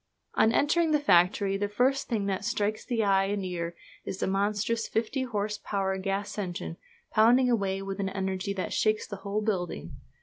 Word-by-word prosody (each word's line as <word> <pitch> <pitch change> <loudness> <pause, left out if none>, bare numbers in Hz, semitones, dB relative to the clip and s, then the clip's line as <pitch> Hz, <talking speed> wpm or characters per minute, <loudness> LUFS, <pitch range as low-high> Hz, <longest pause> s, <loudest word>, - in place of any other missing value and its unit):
On 220 - +4
entering 320 +6 +3
the 300 -1 +3
factory 195 -5 +3
the 205 +1 -1
first 255 +6 +1
thing 220 -5 -1
that 195 -1 -1
strikes 210 +1 -1
the 235 -3 0
eye 195 -1 +3
and 200 -1 -2
ear 170 -2 -3 0.3
is 190 - -5
the - - -1
monstrous 205 +4 0
fifty 230 +4 -1
horse 210 -4 -2
power 195 -2 -1
gas 200 +2 -2
engine, 175 -3 -4 0.3
pounding 245 +3 +5
away 195 -4 0
with 195 0 -5
an 195 -1 0
energy 190 0 -2
that 185 - -3
shakes 215 0 +1
the 200 - -7
whole 200 +2 -2
building. 175 - -2
200 Hz, 180 wpm, -28 LUFS, 195-220 Hz, 0.3 s, pounding